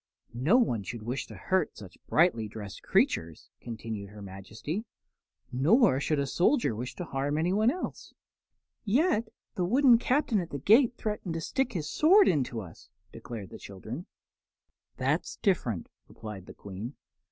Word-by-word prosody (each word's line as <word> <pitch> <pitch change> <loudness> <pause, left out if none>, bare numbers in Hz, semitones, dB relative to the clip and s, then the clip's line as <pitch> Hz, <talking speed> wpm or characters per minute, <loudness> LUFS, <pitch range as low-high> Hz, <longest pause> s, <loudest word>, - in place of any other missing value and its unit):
"No 140 - +3
one 125 - +2
should 110 +3 -6
wish 125 +4 -3
to - - -10
hurt 190 -1 0
such 95 -3 -12
brightly 150 -10 +3
dressed 105 -2 -8
creatures," 80 -1 0
continued 110 -3 -6
her 105 0 -11
Majesty, 105 - -5 0.7
"nor 160 - +4
should 150 +2 0
a 140 - +1
soldier 175 - +2
wish 125 +4 -5
to 180 - -5
harm 140 0 -1
anyone 190 +8 +3
else." 355 +8 -5 0.7
"Yet 235 - +2 0.3
the 180 - -1
wooden 245 +5 +5
Captain 250 -3 +2
at 170 -2 -4
the 140 - -4
gate 230 - +4
threatened 210 -6 -3
to 165 - -2
stick 265 - -1
his 160 -5 -3
sword 380 - +5
into 130 -8 +1
us," 85 -5 -13 0.2
declared 110 -6 -8
the - - -9
child. 95 -2 -11 1.1
"That's - - 0
different," 120 - 0 0.2
replied 105 -4 -9
the - - -11
Queen. 100 +7 -7
145 Hz, 155 wpm, -29 LUFS, -, 1.1 s, wooden